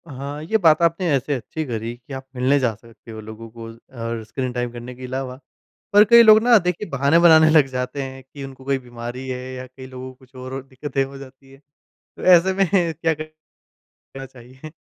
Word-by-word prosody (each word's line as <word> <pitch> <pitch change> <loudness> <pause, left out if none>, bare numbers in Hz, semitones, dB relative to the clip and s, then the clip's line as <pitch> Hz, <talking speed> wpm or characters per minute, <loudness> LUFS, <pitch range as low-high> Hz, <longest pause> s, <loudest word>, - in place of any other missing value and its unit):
हाँ, 140 +1 -7
ये 220 +8 +1
बात 165 -5 +4
आपने 170 +1 +1
ऐसे 135 +2 -1
अच्छी 155 +5 -5
करी 115 -2 -5
कि 125 +3 -13
आप 130 0 -7
मिलने 130 +3 +2
जा 125 -4 0
सकते 115 +1 -16
हो 110 - -8
लोगों 110 +1 -10
को 115 -1 -8 0.4
और 115 -1 -4
स्क्रीन 125 +2 -4
टाइम 120 -1 -3
करने 120 +1 -9
के 130 +1 -9
अलावा, 130 0 -5 0.6
पर 205 +1 +8
कई 235 +2 +8
लोग 215 -1 +7
ना 240 -1 +6
देखिए 180 +2 -3
बहाने 140 +4 +2
बनाने 160 -2 +6
लग 155 -3 +5
जाते 130 +1 -4
हैं 130 0 -9
कि 140 +2 -11
उनको 135 -1 -11
कोई 140 0 +1
बीमारी 120 +1 -8
है 125 0 -4
या 130 0 -8
कई 130 +1 -13
लोगों 130 0 -9
को - - -26
कुछ 130 0 -23
और 130 +1 -7
दिक्कतें 135 +1 -3
हो 135 +1 -11
जाती 135 0 -14
है, 135 - -17 0.6
तो - - -9
ऐसे 185 +1 +5
में 195 0 +1 0.3
क्या 165 0 0
क 155 0 -8 0.9
चाहिए? 130 +3 -13
135 Hz, 210 wpm, -21 LUFS, 125-155 Hz, 0.9 s, पर